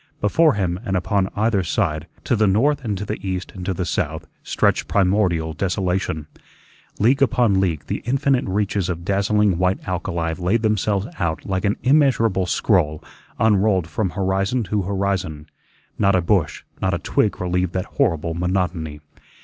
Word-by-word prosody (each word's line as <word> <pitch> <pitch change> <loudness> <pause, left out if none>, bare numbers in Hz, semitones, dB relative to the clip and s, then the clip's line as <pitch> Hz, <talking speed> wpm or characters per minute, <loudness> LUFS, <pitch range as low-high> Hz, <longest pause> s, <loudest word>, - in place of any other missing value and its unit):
Before 150 +7 +3
him 90 -3 -1
and 95 -5 -1
upon 95 +1 0
either 105 -1 +2
side, 80 -2 -1 0.2
to 85 - +1
the 110 -1 +3
north 135 +9 +2
and 105 -4 -2
to 105 - -4
the 105 - -4
east 95 -1 -4
and 90 - -8
to - - +1
the 90 0 -2
south, - - -2 0.2
stretched - - +1
primordial 90 -5 +1
desolation. 90 -2 -1 0.7
League 125 +6 +3
upon 120 -7 +3
league 85 -6 -1
the - - -3
infinite 135 +1 +1
reaches 100 -1 -1
of 85 -1 -4
dazzling 100 -1 +2
white 90 +1 0
alkali 85 -2 -2
laid 100 +6 +1
themselves 105 -2 +1
out 85 -2 -2
like 95 +1 -2
an 100 - +2
immeasurable 120 -9 +3
scroll 80 -6 +1 0.3
unrolled 100 -4 +3
from 95 +3 -2
horizon 95 +5 0
to 105 0 -1
horizon; 95 -6 -2 0.5
not 100 -2 +3
a 90 - +3
bush, 90 -1 0 0.2
not 95 -2 +1
a - - 0
twig - - 0
relieved 90 0 -1
that 95 +1 -2
horrible 85 - 0
monotony. 85 -4 -2
95 Hz, 160 wpm, -21 LUFS, 90-105 Hz, 0.7 s, Before